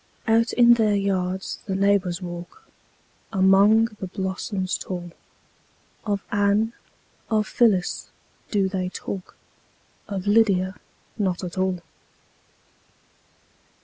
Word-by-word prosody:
Out 230 +1 +3
in 240 -1 +7
their 220 -3 +2
yards 190 -1 -1
the 190 - -1
neighbors 195 -2 +1
walk, 175 - -8 0.6
Among 200 +3 +5
the 190 - -4
blossoms 190 0 -3
tall; 175 -2 -5 1.0
Of 200 -1 -1
Anne, 205 +3 +2 0.6
of 215 -2 +2
Phyllis, 210 -6 +1 0.4
do 200 -3 +1
they 185 -1 -2
talk, 185 0 -7 0.7
Of 195 -2 -4
Lydia 200 -3 +3 0.5
not 190 -3 -1
at 180 - -5
all. 185 -2 -1
195 Hz, 100 wpm, -24 LUFS, 185-210 Hz, 1.0 s, in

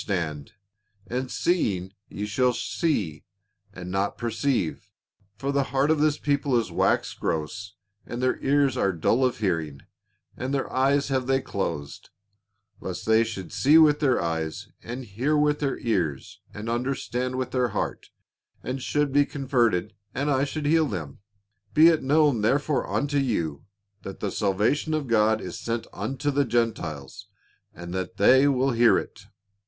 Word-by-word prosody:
445 75 -8 -3 0.6
stand; - - -3
and 130 -1 -5
seeing 100 - 0 0.2
ye 105 - -4
shall 125 +4 +1
see, 105 - -2 0.5
and 90 -2 -8
not 95 +1 -1
perceive: 120 - -1 0.5
for 135 +7 -3
the 140 -1 +1
heart 135 +4 +1
of 160 - +2
this 150 0 +2
people 140 -3 +1
is 115 - -4
waxed - - 0
gross, 95 +6 -3 0.3
and 120 - -5
their 130 0 0
ears 140 -1 +2
are 100 -6 +1
dull 110 +10 +1
of 125 -2 +1
hearing, 80 -8 -2 0.5
and 130 +3 -3
their 135 - -1
eyes 140 +2 +2
have 130 -2 0
they 135 0 +3
closed; 85 - -4 0.7
lest 90 +1 -6
they 110 +1 +4
should 100 -6 -6
see 145 +4 +5
with 150 -2 +6
their 135 -5 +2
eyes, 80 -2 -3
and 125 +2 -6
hear 125 +9 0
with 150 0 +2
their 140 -3 -1
ears, 85 - -2
and 105 +2 -7
understand 125 +1 -2
with 130 -1 -3
their 125 -1 +1
heart, - - -4 0.5
and 130 +1 -4
should 145 0 0
be 145 0 +5
converted, 120 -9 0 0.2
and 140 +3 0
I 135 0 +2
should 150 +1 -4
heal 160 +1 +3
them. 80 - -6 0.6
Be 160 +2 +8
it 160 -2 +2
known 145 -3 +3
therefore 140 +6 +1
unto 145 0 0
you, 85 - -2 0.4
that 95 - -8
the 100 - -2
salvation 105 - 0
of 155 -2 -2
God 110 -2 +3
is - - -6
sent 115 0 -3
unto 135 +8 -2
the 145 +1 +2
Gentiles, 110 - -2 0.4
and 85 +1 -9
that 95 0 -4
they 130 +7 +6
will 135 -1 +2
hear 120 0 +5
it." 100 - -7
125 Hz, 160 wpm, -25 LUFS, 100-140 Hz, 0.7 s, Be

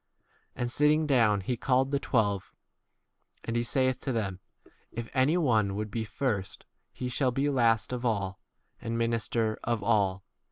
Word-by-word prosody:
And 120 -1 -2
sitting 150 +3 +3
down 115 -8 +3
he 125 +7 -2
called 130 +3 +1
the 140 - +1
twelve; 100 -8 0 0.9
and 115 - -3
he 120 - +2
saith 130 +1 +1
to 135 - -3
them, 100 -6 -2 0.5
If 115 0 -6
any 140 +6 +3
one 110 - +2
would 105 0 -4
be 110 +1 -2
first, 105 -5 -3 0.3
he 125 - -5
shall 125 +1 +1
be 135 +3 0
last 115 -3 +2
of 125 -1 -4
all, 100 -5 -1 0.4
and 115 0 -3
minister 115 -1 0
of 115 -3 -1
all. 100 -3 +2
115 Hz, 160 wpm, -29 LUFS, 105-130 Hz, 0.9 s, sitting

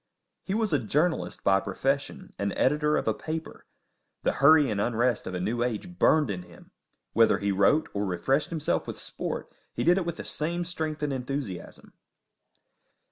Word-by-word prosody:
He 195 - -3
was 220 -5 0
a 145 - +4
journalist 150 - 0
by 95 0 +4
profession, 135 +9 -2
and 100 0 -1
editor 150 +3 +2
of - - -2
a 110 - +3
paper; 160 +7 -6 0.6
the - - +3
hurry 150 0 +7
and 100 -1 0
unrest 120 +1 0
of 95 - -4
a - - -2
new 110 +6 -1
age 125 - -3
burned 150 -8 +4
in 90 -2 -4
him; 90 - -16 0.4
whether 115 0 +5
he 100 0 -1
wrote 100 +11 +3
or 100 - -1
refreshed 105 - 0
himself 160 -3 -1
with - - -5
sport, - - -5 0.2
he - - -1
did 175 +3 +4
it 180 - -3
with 170 - -3
the - - -7
same 170 +3 -2
strength 155 -3 -3
and 145 -2 0
enthusiasm. 130 -7 -5
135 Hz, 180 wpm, -27 LUFS, 105-155 Hz, 0.6 s, hurry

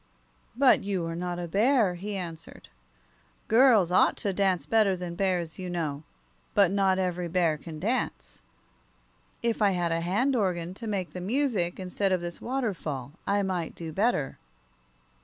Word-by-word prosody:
"But 260 +1 +5
you 195 -4 -2
are 165 0 -4
not 175 0 -3
a 175 -1 -4
bear," 215 - +3
he 200 +4 -5
answered. 165 -4 -8 0.8
"Girls 225 -6 +5
ought 180 - +4
to 200 - -1
dance 190 -2 +1
better 215 -4 +3
than 180 -1 -5
bears, 175 -3 -1
you 185 -1 -5
know. 155 -5 -3 0.5
But 200 -3 +5
not 195 -1 +2
every 180 -2 -1
bear 170 -2 +2
can 155 +1 -9
dance. 230 +9 -3 1.0
If 230 -1 0
I 205 - +5
had 170 -1 0
a 165 0 0
hand 215 +11 +1
organ 180 -5 -1
to 225 +4 -8
make 195 -4 -2
the 180 - -6
music, 205 -5 0
instead 190 +1 -1
of 185 - +2
this 175 0 -6
waterfall, 180 - -3 0.2
I 200 0 +2
might 180 -4 -3
do 165 -2 -7
better." 195 - 0
185 Hz, 160 wpm, -28 LUFS, 170-205 Hz, 1.0 s, But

